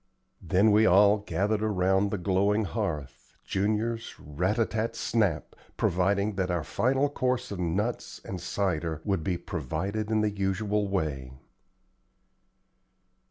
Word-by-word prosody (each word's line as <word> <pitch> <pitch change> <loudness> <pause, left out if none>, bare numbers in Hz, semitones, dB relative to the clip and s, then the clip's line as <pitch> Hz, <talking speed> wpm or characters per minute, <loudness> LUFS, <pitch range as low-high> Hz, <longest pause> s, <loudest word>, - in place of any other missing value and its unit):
Then 100 +3 +3
we 110 +2 +5
all 100 +3 +6
gathered 105 +1 -1
around 95 -1 +2
the 105 - -2
glowing 100 +3 +1
hearth, 75 - -4
Junior's 110 +3 -1
rat 90 +9 -2
a 115 - +3
tat 110 +1 -2
snap! 105 -9 0 0.2
proving 100 +4 +1
that 95 -1 0
our 85 -2 0
final 135 - +1
course 125 -4 -1
of 100 - -5
nuts 95 +7 -2
and 90 -2 -5
cider 85 -4 -2
would 95 -5 0
be 90 +1 -1
provided 90 - -3
in 110 -1 +2
the 105 -1 +1
usual 100 +1 -1
way. 75 -9 -2
100 Hz, 130 wpm, -28 LUFS, 90-110 Hz, 0.2 s, all